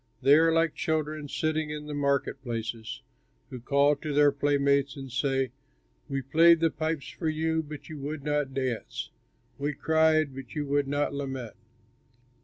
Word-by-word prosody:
They 140 - +6
are 165 +2 +6
like 165 -1 +2
children 155 -1 -2
sitting 155 0 -1
in 150 0 -5
the 150 - -6
market 140 -1 0
places, 115 +1 -5 0.5
who 130 - -6
call 140 +4 +3
to 150 0 -4
their 145 0 +6
playmates 140 -1 +1
and 135 -2 -8
say: 135 -1 0 0.6
"'We 135 -1 -2
played 165 +5 +6
the 165 -1 +2
pipes 155 -1 -3
for 160 - -3
you 160 +1 0
but 150 -1 -9
you 155 -2 -8
would 145 +1 -5
not 145 -2 0
dance; 130 -4 -3 0.5
We 145 +1 -1
cried 160 -1 +2
but 135 -2 -9
you 150 -1 -1
would 140 0 +1
not 145 +1 0
lament.' 135 -5 -5
145 Hz, 165 wpm, -28 LUFS, 135-155 Hz, 0.6 s, They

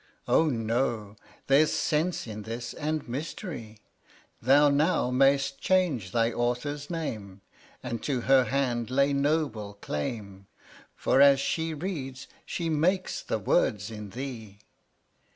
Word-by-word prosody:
Oh 160 - +4
no; 115 -4 -1 0.3
there's 145 +3 +4
sense 160 +4 0
in 110 -2 -7
this, 115 +2 -6
and 155 0 -3
mystery; 125 - -6 0.6
Thou 140 +4 +5
now 145 -2 +2
may'st 135 +1 +3
change 165 - +1
thy 115 +1 +2
authors 125 +5 -2
name, 110 - -5 0.4
And 115 -2 -4
to 130 -4 -1
her 130 0 +4
hand 125 -4 -1
lay 140 +2 +2
noble 140 -8 0
claim; 100 +3 -5 0.5
For 135 - +2
as 140 -1 +7
she 160 +3 -1
reads, 140 -6 -5 0.2
she 170 - -3
makes 175 +4 0
the - - -2
words 105 +2 +1
in 105 -2 -7
thee. 115 -3 -7
135 Hz, 125 wpm, -28 LUFS, 115-150 Hz, 0.6 s, as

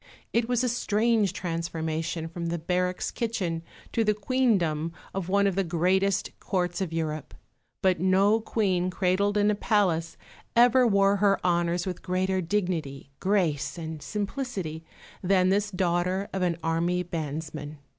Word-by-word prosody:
It 235 0 +1
was 245 0 +2
a - - +2
strange 225 -3 +2
transformation 165 -1 -3
from 170 +1 -5
the 170 +1 -1
barracks 180 +2 -1
kitchen 195 -8 -2 0.3
to 230 - +1
the 210 -1 +2
Queendom 195 -9 +1 0.2
of 190 -2 -3
one 200 +1 +3
of 195 - +2
the 195 +2 +1
greatest 185 +3 +1
Courts 180 0 -1
of 185 -4 -2
Europe; 155 -2 -3 0.5
but 185 -3 +3
no 195 +4 +4
Queen 190 -5 0
cradled 190 +2 +1
in 205 0 +4
a - - +2
palace 195 -6 +1 0.4
ever 245 +1 +6
wore 200 -1 +4
her 200 0 +3
honours 175 0 +1
with 180 -2 -4
greater 185 +1 0
dignity, 165 -7 -2
grace, 175 -8 0
and 160 -2 -6
simplicity 200 - -4 0.4
than 185 0 +3
this 205 +2 +2
daughter 180 +1 0
of 190 - -2
an 175 -2 +1
army 170 +2 +1
bandsman. 155 -2 -5
185 Hz, 145 wpm, -27 LUFS, 165-200 Hz, 0.5 s, ever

